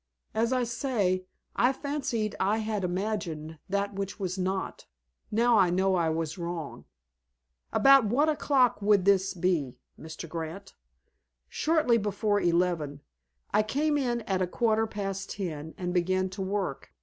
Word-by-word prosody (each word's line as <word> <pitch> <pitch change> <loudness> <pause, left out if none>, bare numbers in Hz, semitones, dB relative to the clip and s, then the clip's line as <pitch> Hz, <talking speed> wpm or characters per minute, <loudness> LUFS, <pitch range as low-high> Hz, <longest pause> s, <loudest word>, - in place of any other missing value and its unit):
As 230 +2 +1
I 255 -1 +2
say, 225 -7 0 0.3
I 245 +2 +4
fancied 270 -6 -2
I 205 +3 +2
had 215 -2 -2
imagined 175 -5 -3
that 200 +1 -1
which 195 +1 -4
was 185 -2 -2
not. 190 0 -3 0.4
Now 230 +1 +4
I 185 -2 +5
know 190 +2 +2
I 170 -3 +2
was 160 +1 -2
wrong." 170 -3 -5 0.9
"About 275 -3 +6
what 260 +9 +2
o'clock 275 -7 +2
would 200 -2 +3
this 195 -1 +3
be, 170 -8 0 0.2
Mr. 160 +1 -8
Grant?" 165 +4 -6 0.8
"Shortly 305 -7 +2
before 205 0 0
eleven. 170 -5 0 0.5
I - - +5
came 295 +8 0
in 245 -4 0
at 190 -3 -1
a 185 - +1
quarter 225 +2 +1
past 195 -2 -4
ten, 160 -5 -5
and 180 -1 -3
began 185 +1 +1
to 190 +1 -7
work. 190 -7 -3
195 Hz, 145 wpm, -28 LUFS, 180-225 Hz, 0.9 s, About